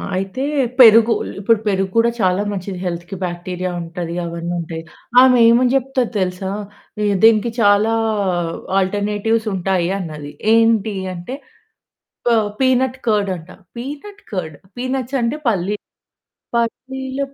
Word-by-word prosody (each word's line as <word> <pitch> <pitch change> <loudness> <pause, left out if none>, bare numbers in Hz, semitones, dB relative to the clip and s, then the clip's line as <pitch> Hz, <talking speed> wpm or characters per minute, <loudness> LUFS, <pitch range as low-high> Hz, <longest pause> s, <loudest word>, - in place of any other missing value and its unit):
అయితే 195 +7 -3 0.4
పెరుగు 230 -1 +8 0.3
ఇప్పుడు 220 +2 +3
పెరుగు 195 -1 +1
గూడా 230 +1 +4
చాలా 185 +1 +2
మంచిది 190 -1 -5
హెల్త్‌కి 175 +2 -4
బాక్టీరియా 180 +1 -4
ఉంటది 170 0 -5
అవన్నుంటాయి. 170 -1 -4 0.4
ఆమె 255 -1 +6
ఏమని 245 +2 +4
చెప్తది 265 -2 0
తెలుసా? 185 +1 -2 0.7
దీనికి 225 +1 +5
చాలా 205 +1 +4 0.9
ఆల్టర్‌నేటివ్స్ 205 +3 0
ఉంటాయి 180 -1 0
అన్నది. 150 -4 -7 0.2
ఏంటి? 225 -2 +3 0.2
అంటే 180 +10 -6 0.9
ప - - +5 0.3
పీనట్ 260 0 +2
కర్డ్ 210 -3 +2
అంట 165 +2 -14 0.3
పీనట్ 295 +11 -8
కర్డ్? 160 -6 -3 0.2
పీనట్స్ 255 +1 -2
అంటే 235 +6 -1
పల్లి 205 -1 0 0.8
పల్లిల 265 +3 -3
205 Hz, 110 wpm, -19 LUFS, 180-240 Hz, 0.9 s, పెరుగు